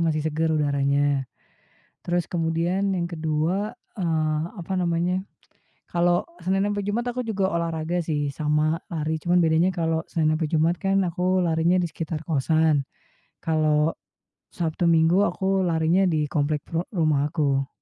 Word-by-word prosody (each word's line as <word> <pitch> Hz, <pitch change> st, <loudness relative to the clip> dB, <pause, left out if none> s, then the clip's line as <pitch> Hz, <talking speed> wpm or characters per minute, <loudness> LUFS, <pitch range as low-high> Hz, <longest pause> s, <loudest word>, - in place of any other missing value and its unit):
masih 155 Hz, -2 st, 0 dB
segar 160 Hz, +1 st, 0 dB
udaranya. 140 Hz, -2 st, +1 dB, 0.8 s
Terus 175 Hz, 0 st, 0 dB
kemudian 175 Hz, +4 st, 0 dB
yang 170 Hz, -, -1 dB
kedua 165 Hz, +5 st, -1 dB, 0.2 s
eee, 155 Hz, -4 st, 0 dB, 0.2 s
apa 180 Hz, +1 st, -5 dB
namanya, 175 Hz, +1 st, 0 dB, 0.7 s
kalau 175 Hz, 0 st, +1 dB, 0.2 s
Senin 195 Hz, +1 st, +1 dB
ampe 205 Hz, -, -2 dB
Jumat 205 Hz, +4 st, -1 dB
aku 250 Hz, -, -3 dB
juga 200 Hz, -5 st, -1 dB
olahraga 170 Hz, 0 st, -1 dB
sih, 150 Hz, -4 st, -2 dB
sama 155 Hz, +3 st, 0 dB
lari, 160 Hz, -1 st, -2 dB
cuman 175 Hz, +1 st, +3 dB
bedanya 165 Hz, +3 st, +3 dB
kalau 165 Hz, -2 st, 0 dB
Senin 155 Hz, -1 st, +1 dB
ampe 160 Hz, -1 st, -1 dB
Jumat 165 Hz, +2 st, +2 dB
kan 195 Hz, 0 st, +1 dB
aku 180 Hz, +1 st, +1 dB
larinya 165 Hz, +2 st, +2 dB
di 175 Hz, -, +1 dB
sekitar 160 Hz, -1 st, -5 dB
kosan, 155 Hz, -1 st, +2 dB, 0.6 s
kalau, 155 Hz, -1 st, +2 dB, 0.6 s
Sabtu, 165 Hz, 0 st, -2 dB
Minggu 170 Hz, +3 st, +4 dB
aku 195 Hz, -2 st, 0 dB
larinya 170 Hz, +2 st, +2 dB
di 155 Hz, -5 st, +1 dB
komplek 145 Hz, +1 st, 0 dB
peru 165 Hz, +1 st, -1 dB
rumahku. 145 Hz, -5 st, +1 dB
165 Hz, 140 wpm, -24 LUFS, 155-175 Hz, 0.8 s, Minggu